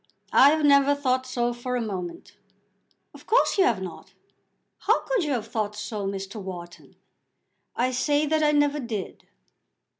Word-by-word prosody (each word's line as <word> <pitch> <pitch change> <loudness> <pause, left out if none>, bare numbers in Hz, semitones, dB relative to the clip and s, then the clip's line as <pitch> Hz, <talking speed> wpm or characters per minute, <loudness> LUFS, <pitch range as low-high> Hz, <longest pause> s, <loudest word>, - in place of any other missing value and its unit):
"I 275 - +8
have 310 0 +2
never 280 0 +5
thought 260 -2 0
so 240 -1 -1
for 250 +1 -4
a - - 0
moment." 185 -6 -6 0.8
"Of - - -16
course 455 -3 +3
you 380 - +6
have 215 -6 +1
not. 180 - -10 0.6
How - - +2
could - - -1
you 295 -2 -1
have 230 -4 -2
thought 210 -2 -2
so, 210 -1 -4
Mr. 195 +2 -5
Wharton?" 175 -2 -9 0.8
"I 250 +2 +1
say 290 +4 +1
that 310 +1 +1
I 300 -1 +4
never 290 0 +2
did." 225 -7 -6
250 Hz, 160 wpm, -25 LUFS, 205-290 Hz, 0.8 s, I